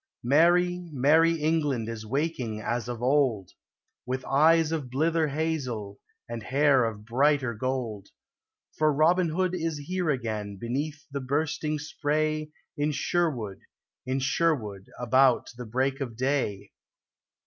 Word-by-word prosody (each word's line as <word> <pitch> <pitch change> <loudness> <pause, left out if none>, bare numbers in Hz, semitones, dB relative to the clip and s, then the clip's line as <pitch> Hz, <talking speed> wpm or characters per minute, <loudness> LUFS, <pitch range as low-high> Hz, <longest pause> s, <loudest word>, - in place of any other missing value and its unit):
Merry, 175 +6 +3
merry 155 +5 +4
England 150 -7 0
is 110 -1 -6
waking 130 -4 -2
as 120 +2 -2
of 120 -1 -5
old, 125 -8 +2 0.5
With 130 +1 -4
eyes 160 +3 +4
of 150 -6 -3
blither 160 +4 +1
hazel 135 -9 -3 0.3
and 115 -1 -5
hair 135 +2 +3
of 105 -2 -5
brighter 135 +1 +2
gold: 115 -4 -3 0.7
For 155 0 +4
Robin 165 +4 +3
Hood 180 +3 0
is 165 -3 -2
here 175 +4 -2
again 110 -7 -2
beneath 145 +8 -4
the 140 0 -3
bursting 150 +3 -1
spray 155 0 -1 0.3
In 145 +1 0
Sherwood, 135 - -1 0.5
in 130 +1 0
Sherwood, 135 - 0
about 130 +1 +3
the 120 -1 -8
break 130 +4 -1
of 120 -5 -5
day. 130 -6 -1
140 Hz, 125 wpm, -27 LUFS, 120-155 Hz, 0.7 s, merry